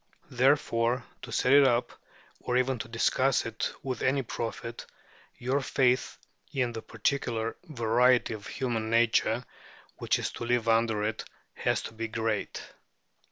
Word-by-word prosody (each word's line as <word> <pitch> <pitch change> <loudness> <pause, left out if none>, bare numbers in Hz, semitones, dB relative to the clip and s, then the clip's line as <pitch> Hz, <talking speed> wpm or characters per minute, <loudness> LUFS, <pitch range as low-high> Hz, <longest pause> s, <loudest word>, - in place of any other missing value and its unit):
Therefore, 125 -2 +2 0.2
to 125 - -9
set 125 +3 +2
it 140 -1 +8
up, 120 -1 +1 0.5
or 125 - -1
even 130 -1 +1
to 110 - -5
discuss 125 +3 +1
it 115 -1 -3
with 130 -3 -3
any 135 +1 +2
profit, 115 0 -5 0.5
your 130 +3 0
faith 130 -2 +1 0.3
in 125 -3 0
the 115 -1 -6
particular 115 0 -2
variety 125 -4 +2
of 105 -1 -8
human 115 -4 -2
nature, 115 0 +2 0.5
which - - +1
is - - -3
to - - -7
live 120 -1 +1
under 115 -2 +2
it, 110 +1 -2 0.3
has - - 0
to - - -7
be 115 0 -4
great. 110 -1 -2
120 Hz, 145 wpm, -29 LUFS, 115-130 Hz, 0.5 s, it